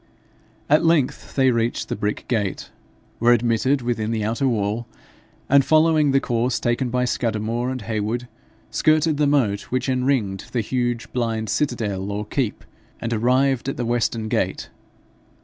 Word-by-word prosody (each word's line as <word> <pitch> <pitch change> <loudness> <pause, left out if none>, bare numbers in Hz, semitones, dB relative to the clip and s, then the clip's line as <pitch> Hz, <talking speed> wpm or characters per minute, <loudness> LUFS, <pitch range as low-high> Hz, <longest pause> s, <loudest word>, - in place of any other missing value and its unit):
At 150 +2 +4
length 165 -6 +1
they 130 -2 +4
reached 115 0 -1
the - - -3
brick 105 +1 -3
gate, 105 -6 -2 0.5
were 120 +1 +5
admitted 120 +3 +1
within 115 -3 -1
the 110 -2 -1
outer 115 +6 0
wall, 110 0 -1 0.6
and 140 0 +5
following 155 0 +4
the 135 0 +4
course 120 -1 0
taken 120 +1 0
by 125 +1 0
Scudamore 115 0 -1
and 130 -3 -4
Heywood, 110 +2 -2 0.4
skirted 155 0 +2
the 150 0 +2
moat 115 -9 +2
which 130 +1 -1
enringed 125 -7 -1
the 120 - +1
huge 120 +1 -2
blind 115 -3 -1
citadel 105 -9 -1
or 105 +1 -3
keep, 115 0 -2 0.4
and 115 0 -3
arrived 130 +3 +2
at - - -4
the 120 - -2
western 115 -1 0
gate. - - -2
120 Hz, 150 wpm, -22 LUFS, 110-130 Hz, 0.6 s, were